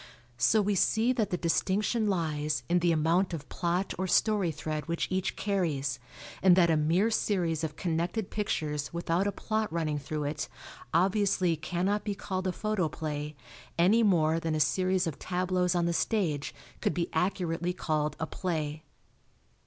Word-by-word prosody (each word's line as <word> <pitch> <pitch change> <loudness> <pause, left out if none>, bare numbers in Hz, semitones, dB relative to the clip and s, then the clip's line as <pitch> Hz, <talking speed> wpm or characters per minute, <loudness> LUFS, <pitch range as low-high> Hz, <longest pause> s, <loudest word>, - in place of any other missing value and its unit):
So 215 - +4
we 205 +1 +1
see 220 +6 +3
that 220 -5 0
the 180 - -1
distinction 205 +6 +1
lies 155 -5 -1
in 175 +1 +3
the 175 0 +2
amount 165 +3 +2
of 145 -3 -8
plot 180 +2 -1
or 190 - 0
story 200 -2 +2
thread 155 0 -4
which 170 0 -1
each 190 0 -1
carries, 150 -10 -1 0.4
and 185 -2 +7
that 170 -2 +5
a - - +4
mere 170 +9 +2
series 175 -7 0
of 155 -1 -3
connected 175 +4 -2
pictures 150 -8 -2
without 170 +3 0
a - - +1
plot 215 +2 -2
running 155 -3 -1
through 150 +2 -4
it 145 +2 -3 0.4
obviously 185 0 +2
cannot 180 +6 -1
be 205 -2 -2
called 185 -1 -3
a - - +1
photoplay 155 -7 -2 0.4
any 195 +7 +5
more 165 -6 +3
than 165 -1 -1
a - - 0
series 185 +5 +2
of 155 -4 -4
tableaus 180 0 0
on 175 -1 +2
the 170 - +1
stage 165 -8 0 0.3
could - - 0
be 175 -1 0
accurately 175 0 0
called 155 -4 -1
a 160 - -1
play. 155 -3 -3
175 Hz, 165 wpm, -29 LUFS, 155-190 Hz, 0.4 s, and